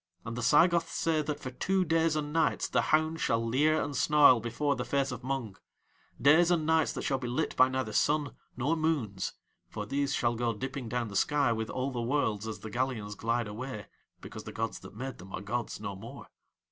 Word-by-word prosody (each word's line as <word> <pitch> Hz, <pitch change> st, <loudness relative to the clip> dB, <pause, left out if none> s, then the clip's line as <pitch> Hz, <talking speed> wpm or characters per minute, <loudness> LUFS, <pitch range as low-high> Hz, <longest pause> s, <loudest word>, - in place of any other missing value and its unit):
And 115 Hz, -, -5 dB
the 120 Hz, -, -3 dB
Saigoths 165 Hz, +6 st, +4 dB
say 160 Hz, -2 st, +1 dB
that 150 Hz, 0 st, -3 dB
for 130 Hz, -, -6 dB
two 190 Hz, +8 st, 0 dB
days 165 Hz, -1 st, +2 dB
and 150 Hz, -1 st, -3 dB
nights 165 Hz, -1 st, +1 dB
the -, -, +2 dB
hound 155 Hz, +1 st, +2 dB
shall 115 Hz, 0 st, +1 dB
leer 150 Hz, +7 st, +2 dB
and 145 Hz, -1 st, -3 dB
snarl 145 Hz, -3 st, +6 dB
before 140 Hz, +5 st, -1 dB
the 125 Hz, -, -3 dB
face 135 Hz, +1 st, 0 dB
of 125 Hz, -2 st, -7 dB
Mung 125 Hz, -7 st, -3 dB, 0.6 s
days 160 Hz, +5 st, +5 dB
and 170 Hz, -3 st, +2 dB
nights 160 Hz, -1 st, +3 dB
that -, -, -5 dB
shall 135 Hz, -1 st, 0 dB
be 125 Hz, -, -4 dB
lit 130 Hz, +6 st, -1 dB
by 130 Hz, -, +5 dB
neither 130 Hz, -4 st, -2 dB
sun 145 Hz, 0 st, +1 dB, 0.2 s
nor 140 Hz, +7 st, +1 dB
moons, 140 Hz, -, -1 dB, 0.4 s
for 105 Hz, -, -5 dB
these 140 Hz, +4 st, -1 dB
shall 120 Hz, -1 st, +1 dB
go 120 Hz, 0 st, -1 dB
dipping 130 Hz, +1 st, -5 dB
down 120 Hz, -1 st, -2 dB
the 100 Hz, -, -8 dB
sky 145 Hz, +1 st, +2 dB
with 110 Hz, 0 st, -3 dB
all 130 Hz, +2 st, -2 dB
the 120 Hz, -2 st, -3 dB
Worlds 115 Hz, -4 st, 0 dB
as 105 Hz, -2 st, -6 dB
the 110 Hz, -, -7 dB
galleons 120 Hz, -4 st, -2 dB
glide 115 Hz, +2 st, -1 dB
away, 105 Hz, 0 st, -6 dB, 0.4 s
because -, -, -9 dB
the -, -, -8 dB
gods 115 Hz, 0 st, -3 dB
that -, -, -13 dB
made 130 Hz, +4 st, -6 dB
them 95 Hz, +2 st, -11 dB
are -, -, -4 dB
gods 110 Hz, +4 st, -3 dB
no 100 Hz, -2 st, -5 dB
more. 115 Hz, +8 st, -10 dB
130 Hz, 215 wpm, -30 LUFS, 115-150 Hz, 0.6 s, snarl